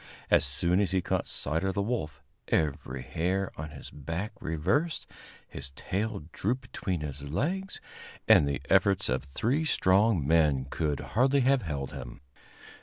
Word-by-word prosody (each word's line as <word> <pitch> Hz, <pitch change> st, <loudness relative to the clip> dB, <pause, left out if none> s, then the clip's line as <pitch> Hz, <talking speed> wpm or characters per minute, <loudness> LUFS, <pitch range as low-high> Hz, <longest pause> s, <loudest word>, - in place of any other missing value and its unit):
As -, -, +6 dB
soon 85 Hz, +7 st, +1 dB
as 100 Hz, -3 st, +2 dB
he 95 Hz, +1 st, +2 dB
caught -, -, -1 dB
sight 80 Hz, +4 st, -1 dB
of 95 Hz, -1 st, -1 dB
the 100 Hz, -, +1 dB
wolf, 100 Hz, -, -3 dB, 0.2 s
every 70 Hz, -4 st, -1 dB
hair 95 Hz, +3 st, -1 dB
on 75 Hz, +1 st, -6 dB
his -, -, -10 dB
back 80 Hz, +8 st, -4 dB
reversed, 120 Hz, -, 0 dB, 0.4 s
his 70 Hz, 0 st, -6 dB
tail 105 Hz, -2 st, -2 dB
drooped 120 Hz, +10 st, -1 dB
between 90 Hz, -5 st, -2 dB
his 70 Hz, -1 st, -5 dB
legs, 180 Hz, -, -2 dB, 0.5 s
and 70 Hz, -, +7 dB
the 70 Hz, -1 st, -2 dB
efforts 95 Hz, 0 st, +3 dB
of 65 Hz, +2 st, 0 dB
three 115 Hz, -, 0 dB
strong 95 Hz, -, +3 dB
men 75 Hz, -5 st, +3 dB
could 75 Hz, 0 st, -1 dB
hardly 135 Hz, +4 st, +4 dB
have 135 Hz, +1 st, +3 dB
held 70 Hz, -7 st, -4 dB
him. 60 Hz, -3 st, -8 dB
85 Hz, 155 wpm, -29 LUFS, 70-110 Hz, 0.5 s, and